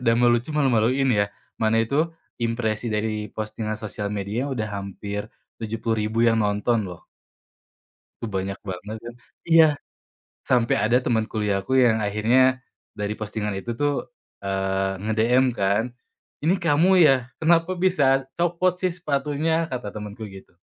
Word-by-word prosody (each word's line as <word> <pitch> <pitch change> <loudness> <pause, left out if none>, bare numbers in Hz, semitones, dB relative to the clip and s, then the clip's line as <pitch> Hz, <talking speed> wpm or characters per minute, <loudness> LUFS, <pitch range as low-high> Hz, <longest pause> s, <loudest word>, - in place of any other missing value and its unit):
Udah 115 -2 +3
mah 120 0 +4
lucu, 120 +3 0
malu-maluin, 135 -2 +2
ya. 100 -2 +2 0.3
Mana 115 0 +3
itu 145 +8 +1 0.3
impresi 115 -1 -1
dari 105 0 -2
postingan 110 0 -4
sosial 105 -1 -5
media 105 +6 -3
udah 110 -6 -3
hampir 100 +2 -6 0.3
70.000 110 0 -1
yang 115 -1 +3
nonton, 105 +1 +1
loh. 90 -2 -10 1.2
Tuh 115 - -3
banyak 95 0 -3
banget 100 +2 -6
kan. 120 +1 -9 0.3
Iya. 165 -1 +7 0.8
Sampai 120 -2 +2
ada 120 +3 +3
teman 115 -3 +1
kuliah 105 -3 0
aku 130 +6 +2
yang 115 -3 +4
akhirnya 120 +6 +3 0.3
dari 105 0 -3
postingan 105 -1 -4
itu 95 +5 -4
tuh, 145 - -1 0.3
eee, 95 0 -1
nge-DM 110 +5 +2
kan, 100 +2 +2 0.6
"Ini 170 +5 +3
kamu 165 0 +3
ya? 135 -6 +4
Kenapa 165 +2 +3
bisa 140 -8 +3
copot 175 +1 +1
sih 185 0 -1
sepatunya?", 160 0 -1
kata 125 -4 -4
temenku 105 +1 -7
gitu. 95 -1 -13
115 Hz, 140 wpm, -24 LUFS, 105-135 Hz, 1.2 s, Iya